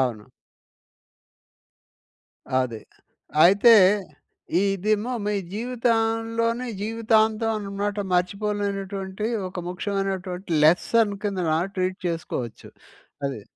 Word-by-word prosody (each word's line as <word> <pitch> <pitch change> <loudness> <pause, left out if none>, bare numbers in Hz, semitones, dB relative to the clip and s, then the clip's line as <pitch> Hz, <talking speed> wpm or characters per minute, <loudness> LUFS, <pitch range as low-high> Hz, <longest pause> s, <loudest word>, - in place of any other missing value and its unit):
అవును. 120 -5 -1 2.4
అది. 115 -4 -3 0.6
అయితే 205 +6 +7 0.9
ఇదేమో 205 +4 0
మీ 210 - 0 0.2
జీవితంలోని 230 +1 0
జీవితాంతం 220 0 +2
అన్నమాట 205 0 -3
మర్చిపోలేనటువంటి 200 +1 -2 0.2
ఒక 180 0 -6
ముఖ్యమైనటువంటి 190 -1 -3
లెసన్ 205 +6 +3
కిందన 185 -6 0 0.2
ట్రీట్ 185 0 -1
చేసుకోవచ్చు. 130 -8 -5 0.6
అది. 130 -7 -5
200 Hz, 70 wpm, -24 LUFS, 185-225 Hz, 2.4 s, అయితే